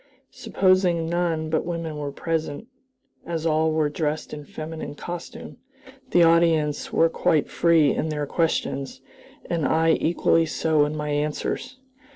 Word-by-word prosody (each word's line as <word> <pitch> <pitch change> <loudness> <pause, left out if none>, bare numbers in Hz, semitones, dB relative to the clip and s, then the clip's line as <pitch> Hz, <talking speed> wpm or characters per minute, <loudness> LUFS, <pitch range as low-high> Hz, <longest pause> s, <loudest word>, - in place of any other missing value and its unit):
Supposing 185 -3 +1
none 165 -2 -1
but 160 - +1
women 165 -2 -4
were 145 -1 -4
present, 160 +3 -3 0.6
as 165 -1 -4
all 160 0 +2
were 155 -1 +1
dressed 150 +1 -3
in 150 -1 -7
feminine 155 0 -7
costume, 175 +3 -8 0.5
the 175 - +5
audience 165 -3 +2
were 165 - +4
quite 160 -2 +1
free 165 -4 +4
in 160 - -2
their 150 -1 -2
questions, 140 -4 -1 0.5
and 170 -2 -1
I 160 +4 +3
equally 165 0 +2
so 155 -1 +2
in 150 +1 -4
my 150 0 -3
answers. 150 - -2
160 Hz, 140 wpm, -24 LUFS, 150-165 Hz, 0.6 s, the